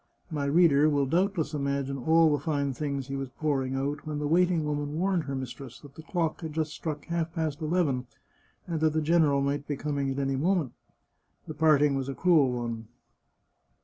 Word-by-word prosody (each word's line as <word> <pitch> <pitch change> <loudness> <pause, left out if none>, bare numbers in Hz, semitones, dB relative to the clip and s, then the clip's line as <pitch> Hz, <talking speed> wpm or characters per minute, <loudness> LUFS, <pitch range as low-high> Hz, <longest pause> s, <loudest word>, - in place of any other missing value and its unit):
My 145 -2 -2
reader 150 -1 +5
will 145 -2 +2
doubtless 175 +3 0
imagine 140 -1 -2
all 160 +4 +4
the 145 -2 0
fine 140 -3 0
things 140 0 -3
he 135 - -4
was 135 -1 -4
pouring 135 -1 -1
out 140 +3 -3
when 150 -1 -3
the 150 - -2
waiting 170 +1 +2
woman 145 0 -2
warned 180 -2 0
her 135 0 -4
mis 130 -2 -4
tress 130 -4 -10
that 145 -2 -14
the 160 - -10
clock 165 -1 -2
had 160 -2 -5
just 155 -1 -2
struck 150 -3 -5
half 170 -1 -2
past 160 -2 -2
eleven, 155 -6 0 0.6
and 165 -2 -3
that 155 0 +2
the 155 - +1
general 155 -3 +3
might 140 +1 -1
be 145 - -2
coming 145 -1 -2
in 135 - -1
at 135 - -4
any 135 0 0
moment. 165 -3 +1 0.8
The 155 - -5
part 155 -1 +4
ing 145 -1 +3
was 135 0 -2
a 135 - -4
cruel 160 -8 +4
one. 115 -2 -4
145 Hz, 210 wpm, -28 LUFS, 140-160 Hz, 0.8 s, reader